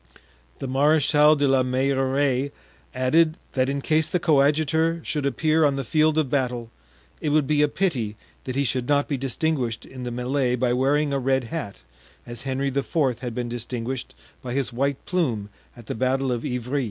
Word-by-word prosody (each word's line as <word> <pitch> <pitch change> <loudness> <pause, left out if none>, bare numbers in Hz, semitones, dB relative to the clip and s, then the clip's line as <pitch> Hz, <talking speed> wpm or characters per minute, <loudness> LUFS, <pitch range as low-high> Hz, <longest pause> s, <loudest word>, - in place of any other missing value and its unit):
The - - -6
Marechal 150 +2 +4
de 145 -1 +1
la 135 -1 +4
Meilleraie 135 +1 +1 0.4
added 155 +6 +2
that 130 0 +1
in 140 0 -2
case 155 +1 +2
the 180 - 0
coadjutor 160 +1 +2
should 145 -3 -1
appear 155 +4 +2
on 145 -2 +3
the 135 - -2
field 155 +4 +2
of 155 -3 +2
battle 125 -4 -2 0.5
it 150 - -1
would 150 -1 +3
be 150 +1 +2
a 150 - +5
pity 135 - -1 0.3
that 130 - -4
he 140 - +2
should 125 -2 -1
not 145 0 +3
be 145 - -1
distinguished 135 -3 -2
in 130 -1 -10
the 125 - -3
melee 125 +1 0
by 125 0 +1
wearing 140 +3 +1
a 140 - +1
red 130 0 +1
hat, 120 - -5 0.4
as 120 -1 -7
Henry 135 +1 -1
IV. 135 -1 0
had 120 -3 -5
been 125 -1 -2
distinguished 120 +1 -5 0.3
by 125 -1 -5
his 135 -2 -1
white 140 +3 0
plume 125 - -1 0.3
at 120 - -12
the - - -4
battle 130 +2 0
of 120 -2 -2
Ivry. 125 +3 -2
135 Hz, 185 wpm, -24 LUFS, 125-150 Hz, 0.5 s, a